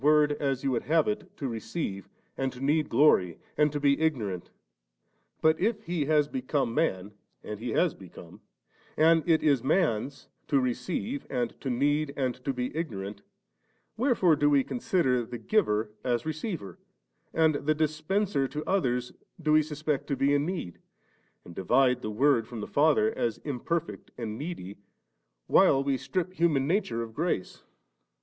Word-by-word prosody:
ord, 150 0 +5
as 135 -2 -1
you 135 - +1
would 120 - -1
have 160 +5 +3
it, 210 0 -3
to 140 - -3
receive, 110 - -4 0.3
and 135 -1 -1
to 125 - -12
need 150 +3 +1
glory, 115 - +4 0.2
and 150 -1 +3
to 145 - -2
be 140 +1 +2
ignorant; 110 - -1 0.9
but 160 0 +3
if 215 +2 0
He 170 -7 -1
has 150 -1 +3
become 130 -2 -1
man 105 - 0 0.3
(and 105 -1 -6
He 120 +2 -4
has 175 -2 +2
become), 90 -2 -13 0.6
and 165 +1 +5
it 160 -1 +4
is 140 -5 +3
man's 140 - 0 0.2
to 140 - +3
receive, 180 - -3
and 120 -2 -1
to 135 - -3
need, 145 +3 0
and 130 -3 0
to 140 - 0
be 125 +1 -4
ignorant, 100 - -4 0.7
wherefore 225 - +3
do 145 0 +2
we 140 -2 +4
consider 135 - 0
the 120 +1 -7
Giver 110 - +1
as 120 -2 0
receiver, 160 - -5 0.5
and 160 -1 +3
the 150 +1 0
Dispenser 155 +1 0
to 150 +3 -5
others 125 -10 0 0.3
do 155 -2 0
we 155 - +6
suspect 150 -1 -3
to 140 - 0
be 140 +2 +2
in 145 +2 +1
need, 175 - -5 0.7
and 85 - -11
divide 125 +8 +2
the 110 - -4
Word 120 +1 +2
from 120 - -7
the 105 - -4
Father 160 +10 +3
as 115 -3 -1
imperfect 155 +4 -3
and 110 -3 -4
needy, 115 - -6 0.7
while 135 0 +4
we 140 -1 +1
•trip 185 +6 -3
human 160 -6 +2
nature 140 - 0
of 110 -1 -9
grace 155 - -2
145 Hz, 165 wpm, -28 LUFS, 120-160 Hz, 0.9 s, we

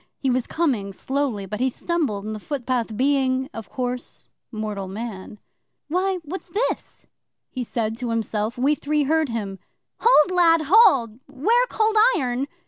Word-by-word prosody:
'He 265 - 0
was 250 -1 0
coming 240 -12 -1
slowly, 260 -3 -2
but 210 +3 -5
he 260 +1 +2
stumbled 265 - -2
in 215 - -4
the 215 - -6
footpath, 245 -4 -3
being, 265 0 +1
of 225 -3 -8
course, 250 -1 -5 0.2
mortal 210 -3 -4
man. 210 0 -7 0.5
'"Why, 370 +3 0
what's 355 +4 -7
this?" 430 +8 -3 0.5
he 255 - -3
said 225 -1 -2
to 245 -1 -4
himself. 225 0 -2
We 270 +4 +3
three 300 0 0
heard 315 +1 +1
him. 200 -4 -4 0.4
'"Hold, 370 -8 +5
lad, 335 -2 +4
hold! 275 - +5
'Ware 450 - +2
Cold 435 0 +1 0.2
Iron!" 255 -2 -1
255 Hz, 150 wpm, -23 LUFS, 220-315 Hz, 0.5 s, Hold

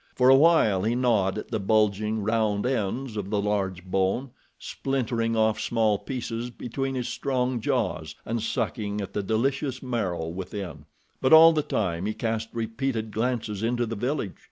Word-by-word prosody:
For 125 0 +4
awhile 135 - +5
he 115 +4 0
gnawed 110 -6 +2
at - - -6
the 110 - 0
bulging, 105 +1 +1
round 110 -1 +1
ends 125 0 -1
of 100 -2 -4
the 105 -1 0
large 95 -3 -1
bone, 95 +8 0 0.3
splintering 115 -4 -2
off 110 0 +2
small 110 -3 +1
pieces 120 -2 -4
between 135 +3 -4
his 125 -2 -2
strong 130 -2 -1
jaws, 105 - -1
and 115 0 -2
sucking 105 -3 -2
at 100 -2 -5
the 105 - -1
delicious 130 +6 -1
marrow 100 -10 -2
within; 90 -3 -6 0.4
but 130 +3 +4
all 165 +1 +9
the 155 - +2
time 95 - -1
he 110 - -2
cast 115 -1 -2
repeated 115 0 -3
glances 110 -2 -2
into 120 +1 0
the 115 0 -4
village. 120 -2 -2
110 Hz, 160 wpm, -26 LUFS, 100-125 Hz, 0.4 s, all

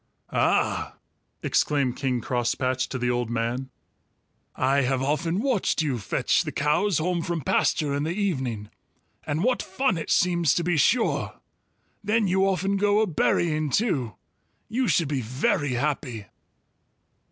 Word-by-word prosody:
"Ah!" - - +1 0.5
exclaimed 140 -4 +1
King 130 -3 -1
Crosspatch 130 +2 -1
to 130 - -3
the 125 0 0
old 120 -1 -1
man, 120 +3 -2 0.9
"I 135 +2 +2
have 130 0 0
often 155 +5 0
watched 240 -10 +1
you 135 -6 -1
fetch 95 - +1
the - - -4
cows 150 +6 +1
home 170 +2 0
from 170 -1 -3
pasture 145 +2 +1
in 140 - -1
the 155 - -1
evening, 130 - -2 0.6
and 155 +4 -1
what 250 +1 +1
fun 190 -2 -1
it 155 - -6
seems, 175 -4 +3
to 170 - 0
be 175 0 +1
sure! 225 - +1 0.6
Then 215 0 +2
you 190 +1 +2
often 195 +1 0
go 205 +1 +3
a - - +3
berrying 155 -3 +1
too. 140 - 0 0.5
You 245 +3 0
should 165 -2 +2
be 140 -2 -1
very 140 - 0
happy." 125 -4 -2
150 Hz, 145 wpm, -25 LUFS, 130-190 Hz, 0.9 s, seems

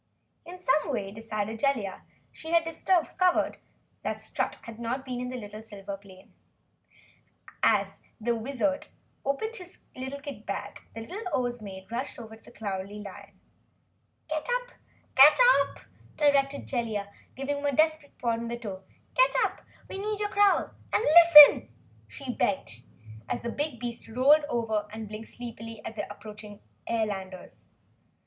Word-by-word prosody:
In 360 +1 -9
some 305 -4 +1
way, 200 -6 -3
decided 220 0 -4
Jellia, 230 -9 0 0.3
she 320 - -10
had 335 0 +4
discovered 355 +2 +1 0.6
Strut - - -3
had 230 -1 -10
not 245 +3 -3
been 250 -2 -4
in 250 - -4 0.2
the 215 +1 -8
silver 200 -2 -7
plane. 190 -1 -17 1.3
As - - +2 0.2
the 235 +2 0
Wizard 275 +4 -1 0.4
opened 440 - -2
his 360 -1 -12 0.2
kit 275 +2 -7
bag - - -5
the 225 - -5
little 360 - -2
Oz 240 -1 -4
Maid 190 -1 -9
rushed 245 +4 -4
over 220 -2 -9
to 225 - -21
the - - -15
Cowardly 200 -1 -5
Lion. 200 -1 -11 0.9
"Get 310 -1 -3 1.0
up!" - - +4 0.4
directed 280 -1 +2
Jellia, 215 -5 -3 0.2
giving 275 +2 -2
him 285 - -5
a - - +2
desperate 310 -1 +1
prod 230 -1 -1
with 235 - -4
her - - -3
toe. 200 -5 -7 0.3
"Get - - +4
up! - - -2 0.3
We 385 - -6
need 420 +1 -2
your 415 -1 -1
growl 405 -1 +3 0.2
and - - +2
LISTEN!" 300 - +9 0.4
she 250 - -6
begged, 190 - -1 0.5
as - - -2
the 235 - -2
big 290 -3 -3
beast 240 -1 -6
rolled 275 +6 +4
over 220 -4 -1
and 220 0 -6
blinked 215 +1 -8
sleepily 230 -2 -8
at 220 - -6
the 205 -1 -5
approaching 210 0 -11 0.3
airlanders. 195 -5 -4
235 Hz, 145 wpm, -28 LUFS, 215-290 Hz, 1.3 s, LISTEN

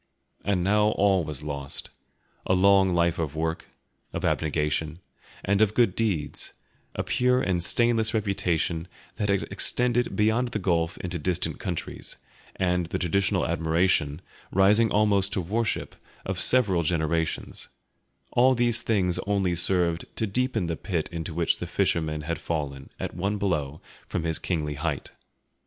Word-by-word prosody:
And 95 -3 +1
now 105 +3 +3
all 95 -3 +3
was 75 -2 -6
lost: 70 -2 -5 0.6
a 95 - +3
long 95 -1 +5
life 85 0 +2
of 80 -3 -2
work, 80 +1 -2 0.5
of - - -2
abnegation, 75 0 0 0.5
and 100 +1 +2
of 110 -1 +3
good 115 -7 +3
deeds, 90 -10 -2 0.4
a - - -1
pure 125 0 +2
and 90 -7 0
stainless 115 +3 +2
reputation 90 -6 -1 0.3
that 105 -2 -1
had 100 -1 +2
extended 120 0 0
beyond 110 +4 +2
the 120 - -3
gulf 85 -3 0
into 90 -1 -4
distant 85 +3 -1
countries, - - -5 0.4
and 90 -2 0
the - - -2
traditional 95 +3 +1
admiration, 80 -1 +1 0.3
rising 105 +4 +4
almost 100 -2 +2
to - - +1
worship, 105 +5 -2 0.3
of 95 -2 -3
several 105 -9 +4
generations; 80 0 -1 0.6
all 130 +2 +4
these 120 -1 +2
things 95 -6 +1
only 100 -3 +1
served 85 -1 +1
to 110 - 0
deepen 115 -1 0
the 85 -1 -2
pit 85 -2 -3
into 85 0 -4
which 85 +1 +1
the - - -4
fisherman 80 -2 0
had 85 +2 -3
fallen, 70 -4 -4
at - - -4
one 100 +4 -1
blow, 80 -7 -1 0.3
from 85 - -2
his 80 -1 -1
kingly 75 -4 -2
height. 70 - -3
90 Hz, 145 wpm, -26 LUFS, 80-105 Hz, 0.6 s, long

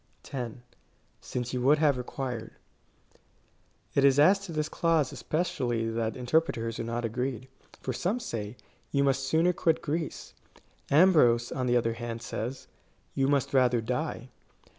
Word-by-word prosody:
10. 120 -2 -6 0.6
Since 125 0 -4
you 125 - -1
would 140 +4 +5
have 150 -2 +3
required. 125 -1 -5 1.4
It 140 - +3
is 140 -1 +5
as 185 +7 +6
to 200 -3 -8
this 155 -1 -1
clause 160 -4 +1
especially 120 -8 -1
that 115 0 -2
interpreters 120 -4 0
are - - -1
not 115 +1 -3
agreed. 125 +2 -3 0.4
For 130 - -2
some 190 - -1
say, 115 - -5 0.2
" - - -37
You 140 -1 +2
must 135 -1 +1
sooner 165 +5 +3
quit 165 -2 +1
Greece.'' 155 +1 -4 0.6
Ambrose, 140 -8 +5
on 130 -1 -2
the 125 0 +3
other 115 -1 0
hand, 115 0 -6
says, 120 +5 -5 0.2
" - - -39
You 135 0 +1
must 140 -2 +1
rather 125 -2 +4
die." 125 +2 -3
130 Hz, 155 wpm, -28 LUFS, 120-150 Hz, 1.4 s, as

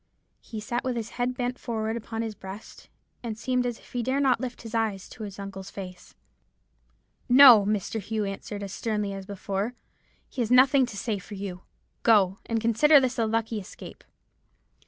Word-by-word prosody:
He 220 - -8
sat 240 +3 -3
with 255 -1 -1
his 230 -1 -4
head 245 +1 -2
bent 250 0 -2
forward 220 -1 -2
upon 225 0 -4
his 220 -1 -4
breast, 195 +1 -11 0.3
and 225 -3 -5
seemed 250 +1 0
as 240 -2 -3
if - - -20
he 245 - -1
dare 260 +4 0
not 265 -4 +3
lift 250 -2 -5
his 225 -1 -9
eyes 220 -4 -1
to 235 - -12
his 205 -2 -7
uncle's 195 -1 -7
face. 185 -2 -10 1.1
"'No!' 245 -5 +9
Mr. 210 +1 -1
Hugh 215 +1 -2
answered, 200 +1 -6
as 195 -1 -6
sternly 210 -3 -2
as 195 -1 -8
before, 200 +3 -3 0.5
'he 255 - -4
has 225 - -1
nothing 260 +1 +5
to 210 - -8
say 210 -1 -2
for 205 +2 -10
you. 190 -2 -6 0.4
Go; 200 -3 +4
and 230 -1 0
consider 235 +7 +5
this 260 -2 -1
a 225 - +2
lucky 225 0 -1
escape.' 190 - -11
225 Hz, 185 wpm, -27 LUFS, 200-245 Hz, 1.1 s, No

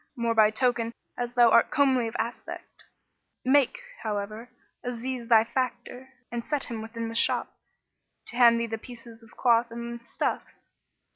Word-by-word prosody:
more 235 -1 0
by 215 -1 +6
token 230 0 0 0.2
as 245 0 -4
thou 240 -2 +6
art 235 - +5
comely 260 -4 +3
of 225 - -7
aspect. 235 +2 -6 0.6
Make, 275 - +4 0.2
however, 215 +2 -4 0.3
Aziz 245 0 -4
thy 225 -2 +7
factor 255 +1 -4 0.2
and 235 -1 -3
set 295 +1 -2
him 230 -3 -5
within 230 +1 -5
the 225 - -6
shop, 230 - +1 0.7
to - - -3
hand 235 -1 +6
thee 235 - 0
the 225 -1 -4
pieces 235 -1 -12
of 225 - -19
cloth 235 -1 +4
and 235 0 -7
stuffs." 235 - -4
235 Hz, 155 wpm, -27 LUFS, 230-245 Hz, 0.7 s, thy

